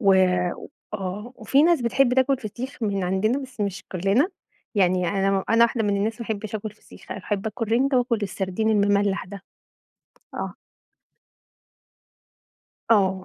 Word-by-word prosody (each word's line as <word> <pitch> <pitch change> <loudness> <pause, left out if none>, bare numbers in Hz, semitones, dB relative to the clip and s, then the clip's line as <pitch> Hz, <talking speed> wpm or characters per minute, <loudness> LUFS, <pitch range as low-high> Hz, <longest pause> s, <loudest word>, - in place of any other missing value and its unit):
و 195 -4 +5 0.8
آه، 205 +5 -5
وفي 265 +5 +3
ناس 335 -3 +4
بتحب 250 +1 +3
تاكل 265 +1 +3
فسيخ 240 +3 -7
من 200 -3 0
عندنا 195 +8 +1
بس 260 -5 -9
مش 200 -1 -2
كلنا، 195 - +2 0.5
يعني 180 -3 +2
أنا 195 -1 +1
أنا 230 +1 +6
واحدة 235 -1 0
من 205 -1 +1
الناس 220 +4 -1
ما 235 - -5
احبش 215 -1 -4
آكُل 215 0 -3
فسيخ، 210 - -12
أحب 200 +1 -3
آكُل 225 +1 -3
رِنجة 265 +2 +3
وآكُل 240 -2 +1
السردين 195 +2 -1
المملَح 205 -1 +2
ده. 200 +1 -9 0.9
آه. - - -4 2.4
آه. 190 -4 +3
210 Hz, 140 wpm, -24 LUFS, 195-235 Hz, 2.4 s, أنا